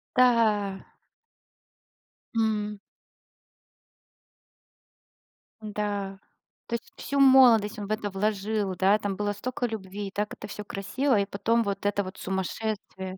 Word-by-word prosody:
Да. 220 -6 +3 1.5
М. 210 -2 0 2.8
Да. 205 -2 -3 0.5
То - - -6
есть, 235 - -7
всю 280 0 -2
молодость 250 -6 +6
он 205 -1 -5
в - - -6
это 215 -1 -1
вложил, 205 0 -1
да, 195 +3 +4
там 205 -2 -3
было 205 0 -1
столько 250 +5 -3
любви, 205 -2 -5
и - - -8
так 210 +1 -2
это 210 - -8
всё 210 +1 -7
красиво, 215 +6 0
и 200 - +1
потом 230 +4 +1
вот 200 -1 -3
это 205 0 +1
вот 185 +1 -8
сумасшествие. 190 0 -4
210 Hz, 125 wpm, -27 LUFS, 195-220 Hz, 2.8 s, молодость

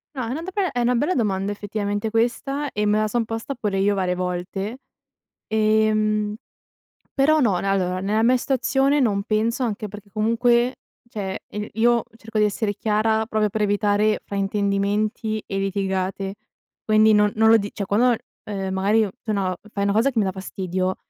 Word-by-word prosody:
No, 260 - -2
è - - -5
una 280 +6 -3
do 365 +3 -6
beh, 380 -5 0
è 245 - -1
una 245 +1 +2
bella 295 +10 +1
domanda 200 -4 0
effettivamente 205 +1 -3
questa, 275 +6 -1
e 210 0 -1
me 210 +1 +3
la 215 - +1
son 235 +2 0
posta 225 +5 -5
pure 210 -5 -2
io 200 +1 +2
varie 185 -2 0
volte, 185 +5 -4 0.7
ehm, 215 -1 +2 0.8
però 305 +3 +3
no. 200 -8 +2
Ne 195 - -3
allora, 185 -2 0
nella 210 +4 0
mia 250 +2 +4
situazione 270 +2 +1
non 200 -5 +1
penso, 225 +4 0
anche 215 -2 -3
perché 205 0 -11
comunque, 235 +4 +2 0.3
cioè, 195 -4 -4
i 210 0 -5
io 235 +2 +3
cerco 225 -1 -7
di 210 - +5
essere 205 0 -1
chiara 220 +1 +1
proprio 215 -2 0
per 215 +2 -3
evitare 205 +1 +2
fraintendimenti 205 +2 -1
e 195 - -4
litigate, 195 0 -2 0.5
quindi 215 0 +5
non 210 0 +3
non 220 0 +4
lo 225 - +8
dic 205 -1 -4
cioè, 205 -3 -3
quando 205 +5 +2
ho - - +5
l - - -1 0.3
ehm, 195 -2 -3
magari 205 +4 +3
o 205 - -3
tu, 215 - -2
no, 190 -2 -1
f - - -17
fai 200 - -1
una 200 - +2
cosa 230 +6 +3
che 240 - -9
mi 215 - +4
dà 190 - 0
fastidio, 185 -1 -3
215 Hz, 195 wpm, -23 LUFS, 200-230 Hz, 0.8 s, lo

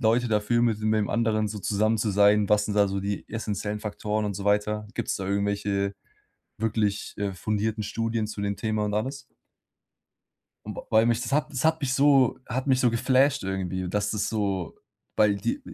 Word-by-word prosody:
Leute 120 +1 +2
dafür, 110 +2 +1
mit 115 -3 +2
de 110 - -2
mit 110 0 +3
dem 105 - -1
anderen 110 -2 +1
so 105 0 -5
zusammen 110 +3 +1
zu 110 0 0
sein, 105 +1 +4
was 105 0 +3
sind 105 - -3
da 100 -1 +4
so 100 0 -2
die 100 0 -4
essenziellen 105 -1 -3
Faktoren 105 0 -2
und 105 - -1
so 100 +1 -6
weiter? 105 +1 +1
Gibt's - - -2
da 95 - -5
irgendwelche 100 0 -1 0.6
wirklich, 105 -2 -1
äh, 100 -1 -1
fundierten 105 +3 -2
Studien 115 +1 -2
zu 105 -1 -6
dem 100 0 -1
Thema 110 -1 -1
und 105 - -2
alles? 135 +6 -2 1.4
Und - - -6
weil 110 +1 +5
mich 120 0 +2
das 120 - -5
hat 150 +1 +1
das 130 -2 -3
hat 160 0 +3
mich 135 -3 -1
so 135 -2 +4
hat 130 +3 -3
mich 130 -2 +3
so 125 - +4
geflasht 130 +3 +2
irgendwie, 95 -1 -3
dass 105 +2 -1
das 105 -1 -1
so 100 -5 -2 0.4
weil 105 -1 +4
die 275 - -2
105 Hz, 200 wpm, -26 LUFS, 100-115 Hz, 1.4 s, weil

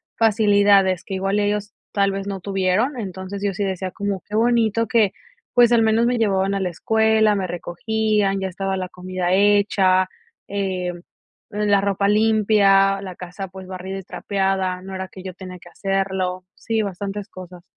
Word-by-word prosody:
facilidades 205 -4 +4
que 195 - -5
igual 195 +2 0
ellos 205 0 -1 0.2
tal 200 -1 +2
vez 195 0 -4
no 195 -2 -4
tuvieron. 195 +7 0
Entonces, 190 -1 -6
yo 200 -2 -1
sí 205 - -2
decía 190 -1 -2
como: 200 0 -3
"Qué 210 - -4
bonito 230 -1 +2
que, 225 -5 +2 0.4
pues 240 -1 +5
al 235 -1 +5
menos 225 +1 +3
me 245 0 +1
llevaban 195 -3 +1
a 200 - -1
la 190 -2 -1
escuela, 220 +4 +2
me 195 -2 -1
recogían, 200 +3 -1
ya 190 0 -2
estaba 195 +1 -3
la 185 -1 -3
comida 180 0 -3
hecha, 195 -2 +3 0.4
eh, 185 -3 -2 0.6
la 205 -1 +2
ropa 200 0 0
limpia, 205 -2 +4
la 185 -2 -7
casa, 180 +2 -7
pues, 190 0 -11
barrida 190 +1 -6
y - - -10
trapeada", 190 -1 -1
no 190 +1 -8
era 190 0 -4
que 185 - -12
yo 185 -1 -6
tenía 185 -1 -9
que 175 - -15
hacerlo. 190 -1 -2
Sí, 225 -1 -1
bastantes 200 0 -5
cosas. 180 -1 -11
195 Hz, 170 wpm, -21 LUFS, 185-210 Hz, 0.6 s, pues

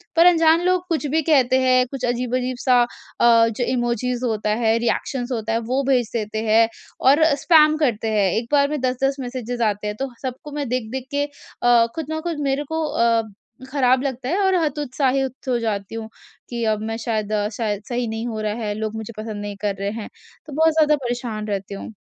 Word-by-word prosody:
पर 335 +1 +6
अनजान 330 -1 +5
लोग 365 0 +2
कुछ 315 -3 0
भी - - +3
कहते 260 -3 +4
हैं 255 -1 +4
कुछ 265 -2 -3
अजीब-अजीब-सा 250 +1 +1 0.4
अ, 230 -1 +6
जो 230 +2 -3
इमोजीस 240 0 -1
होता 220 -3 -1
है 225 0 +3
रिएक्शन्स 245 +2 -2
होता 225 -2 -2
है 230 - +1
वो 275 +1 +1
भेज 245 -4 +2
देते 215 -1 -2
हैं। 225 +1 +5 0.3
और 285 +4 +5
स्पैम 305 0 +5
करते 235 -7 0
हैं 205 -3 +2
एक 230 +1 -2
बार 280 -1 +4
में 300 0 -2
10-10 260 +2 0
मैसेजेस 245 -2 -4
आते 210 0 -2
हैं। 210 - -3
तो 270 - -2
सबको 260 +3 -6
मैं 290 -1 -3
देख-देख 250 +1 -3
के 285 0 +1 0.4
अ, 240 -1 +6
खुद 320 -2 -3
ना 315 0 -2
खुद 335 -2 -3
मेरे 275 +2 0
को 320 0 0
अ, 230 -5 +2 0.5
खराब 260 -2 +3
लगता 260 -2 -3
है 365 - +1
और 380 -1 +3
हत 300 -1 -1
उत्साहित 265 -1 -1
हो 245 - +2
जाती 210 -2 -3
हूँ। 225 -1 -6 0.4
कि 235 -1 -3
अब 210 - -4
मैं 225 - -3
शायद 215 -2 -1 0.2
शायद 210 -3 -2
सही 245 -1 -1
नहीं 225 +2 -4
हो 220 -2 -4
रहा 210 -1 -1
है, 210 - -1
लोग 215 0 -4
मुझे 220 +1 -6
पसंद 215 -1 -5
नहीं 205 0 -5
कर 205 -2 -1
रहे 200 +1 -2
हैं। 220 -1 -6 0.4
तो 305 - -10
बहुत 320 +2 +3
ज़्यादा 305 -1 +4
परेशान 235 -3 -4
रहती 200 -1 -3
हूँ। 210 - -8
245 Hz, 205 wpm, -22 LUFS, 220-275 Hz, 0.5 s, पर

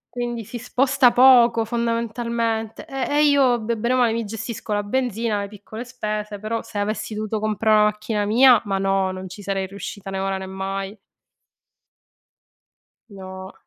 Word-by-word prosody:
quindi 240 -1 -3
si 240 - -7
sposta 255 +1 +3
poco, 240 -2 +6
fondamentalmente, 230 -1 -2
ehm, 270 -1 -3
e 295 +1 +3
io 275 -5 +4
be 230 +1 -2
brema 235 +1 +2
mi 230 +1 -1
gestisco 225 +1 -6
la 205 0 0
benzina, 230 -1 -1
le 200 - -4
piccole 210 +3 -9
spese; 215 -4 -4
però 220 +2 -3
se 225 -2 -9
avessi 215 +1 -2
dovuto 215 0 -3
comprà 215 +1 +1
na 210 0 +6
macchina 210 0 -1
mia, 235 +3 +6
ma 195 -1 -1
no, 195 0 +1
non 185 0 -7
ci 190 +3 -10
sarei 195 -1 -2
riuscita 195 0 -8
né 190 - -3
ora 195 0 -1
né 190 - -6
mai. 195 +1 -5 2.1
No. 190 -1 -9
220 Hz, 160 wpm, -22 LUFS, 200-235 Hz, 2.1 s, poco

